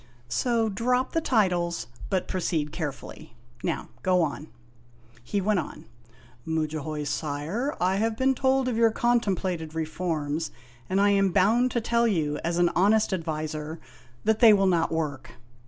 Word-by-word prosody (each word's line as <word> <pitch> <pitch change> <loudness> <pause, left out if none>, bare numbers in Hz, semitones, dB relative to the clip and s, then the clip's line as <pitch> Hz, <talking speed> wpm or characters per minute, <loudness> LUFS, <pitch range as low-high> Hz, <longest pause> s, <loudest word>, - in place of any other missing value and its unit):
" - - -31 0.2
So 235 -3 +2
drop 250 +5 0
the 330 - 0
titles, 180 - +1 0.2
but 185 - 0
proceed 165 -5 -1
carefully. 145 -5 -7 0.3
Now - - -2
go 180 -2 +3
on." 150 0 -4 0.8
He 200 +12 -1
went 205 0 +2
on: 160 - -7 0.6
"Mudjahoy, 155 -1 -2
sire, 155 - -2
I 185 +2 +2
have 220 +1 0
been 265 +2 +3
told 265 0 +1
of 250 - 0
your 230 0 +4
con 240 +2 +2
templated 180 -6 -3
reforms, 160 -1 -2 0.4
and 190 - +1
I 205 0 +4
am 195 -1 +3
bound 220 +7 +3
to 240 - -1
tell 235 +1 +2
you, 155 -8 0
as 170 +1 -1
an 175 -1 +3
honest 210 +3 +3
ad 175 -3 -2
viser, 155 0 -4 0.5
that 220 0 +2
they 230 -3 +8
will 195 -1 +3
not 170 -3 +2
work. 150 -5 -3
185 Hz, 160 wpm, -26 LUFS, 160-220 Hz, 0.8 s, they